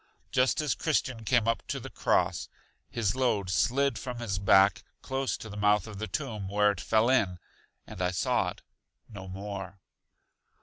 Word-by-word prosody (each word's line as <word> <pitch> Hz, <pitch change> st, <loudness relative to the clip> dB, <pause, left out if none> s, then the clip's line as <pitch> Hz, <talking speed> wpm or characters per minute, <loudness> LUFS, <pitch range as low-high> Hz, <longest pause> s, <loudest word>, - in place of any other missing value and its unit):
Just 130 Hz, +4 st, +2 dB
as 150 Hz, -3 st, +1 dB
Christian 130 Hz, -7 st, -1 dB
came 115 Hz, 0 st, +2 dB
up 115 Hz, -, +1 dB
to -, -, -3 dB
the -, -, -9 dB
cross, -, -, +1 dB, 0.4 s
his 115 Hz, -4 st, -1 dB
load 110 Hz, -8 st, +1 dB
slid 135 Hz, +8 st, +2 dB
from 125 Hz, -2 st, -5 dB
his 105 Hz, -5 st, -2 dB
back, 95 Hz, +1 st, +5 dB, 0.2 s
close 135 Hz, -1 st, -2 dB
to -, -, -9 dB
the 105 Hz, -, -8 dB
mouth 105 Hz, 0 st, +3 dB
of 105 Hz, -3 st, -9 dB
the 110 Hz, -, -3 dB
tomb, 105 Hz, -2 st, -4 dB
where 105 Hz, +1 st, +3 dB
it 100 Hz, -, -6 dB
fell 110 Hz, +1 st, +2 dB
in, 110 Hz, -9 st, +2 dB, 0.5 s
and 90 Hz, -, -8 dB
I 90 Hz, -, +2 dB
saw 90 Hz, -1 st, +1 dB
it -, -, -11 dB, 0.4 s
no 100 Hz, -4 st, -9 dB
more. 95 Hz, 0 st, -6 dB
105 Hz, 175 wpm, -29 LUFS, 100-125 Hz, 0.5 s, back